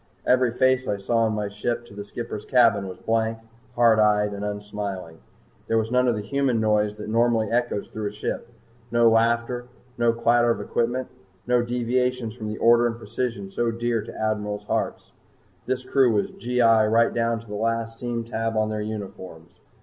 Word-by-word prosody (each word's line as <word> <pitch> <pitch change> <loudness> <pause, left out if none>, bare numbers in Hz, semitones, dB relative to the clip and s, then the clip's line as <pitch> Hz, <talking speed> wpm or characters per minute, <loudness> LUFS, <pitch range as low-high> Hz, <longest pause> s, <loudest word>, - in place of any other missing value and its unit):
Every 125 -1 +4
face 130 +2 +2
I 100 - 0
saw 100 +4 -1
on 110 - 0
my 105 -1 -2
trip 120 +4 -3
to 110 - -15
the 100 0 -6
skipper's 110 0 -6
cabin 115 -6 +3
was 95 - -8
blank, 115 0 0 0.4
hard 115 -2 +5
eyed, 105 -1 +3
and 100 0 -5
unsmiling. 105 -5 -5 0.5
There 115 - +2
was 110 +1 -1
none 125 0 +3
of 120 - +2
the 105 - -4
human 135 -1 0
noise 105 -1 +1
that 105 0 -8
normally 115 -1 +2
echoes 120 -3 0
through 110 -1 -4
a - - -4
ship, 105 +2 -4 0.4
no 120 +1 +4
laughter, 115 +2 +1 0.3
no 120 0 +4
clatter 120 +1 +3
of 115 - +1
equipment, 120 +2 -1 0.4
no 125 0 +3
deviations 125 0 -1
from 110 -3 -6
the 105 0 -4
order 120 +1 +5
and 115 -1 -4
precision 115 -5 -4
so 120 +3 0
dear 115 0 -1
to - - -10
admirals' 105 -1 -2
hearts. - - -2 0.6
This 130 0 -2
crew 130 -2 +3
was 105 -2 0
G.I. 115 -3 +3
right 115 +2 +3
down 115 0 0
to 115 - -14
the 105 - -9
last 115 +1 -2
seam 120 -1 -3
tab 115 -1 -2
on 110 0 +1
their 105 0 -2
uniforms. 95 -6 -7
115 Hz, 190 wpm, -24 LUFS, 105-120 Hz, 0.6 s, hard